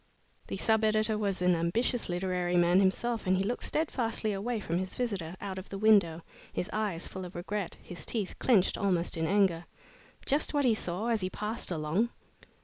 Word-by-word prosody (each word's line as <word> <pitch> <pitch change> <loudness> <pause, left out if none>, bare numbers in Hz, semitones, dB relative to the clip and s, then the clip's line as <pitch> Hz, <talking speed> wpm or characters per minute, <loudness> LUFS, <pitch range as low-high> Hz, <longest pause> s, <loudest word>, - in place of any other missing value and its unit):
The - - -4
sub 220 0 +2
editor 215 0 +2
was 200 -3 -1
an 180 0 +5
ambitious 205 +9 0
literary 180 0 0
man 175 +1 +5
himself 220 +4 +1
and 185 0 +4
he 190 - +1
looked 240 +5 -2
steadfastly 230 -8 0
away 220 +4 -2
from 175 -3 -1
his 185 0 -4
visitor, 195 -9 -2
out 190 -2 -5
of 190 - -10
the 195 - -5
window, 195 -6 +4 0.3
his 185 - -3
eyes 205 -6 -2
full 190 - -6
of 180 0 -9
regret, 190 +2 -4
his 175 - -7
teeth 210 -5 -1
clenched 210 -8 +3
almost 180 -4 +1
in 160 0 -1
anger. 185 -4 +2 0.6
Just 295 +2 +1
what 285 -1 +3
he 240 - +5
saw 210 +2 -2
as 225 -3 +1
he 185 - -1
passed 210 +4 -3
along! 175 +7 0
195 Hz, 190 wpm, -30 LUFS, 180-220 Hz, 0.6 s, an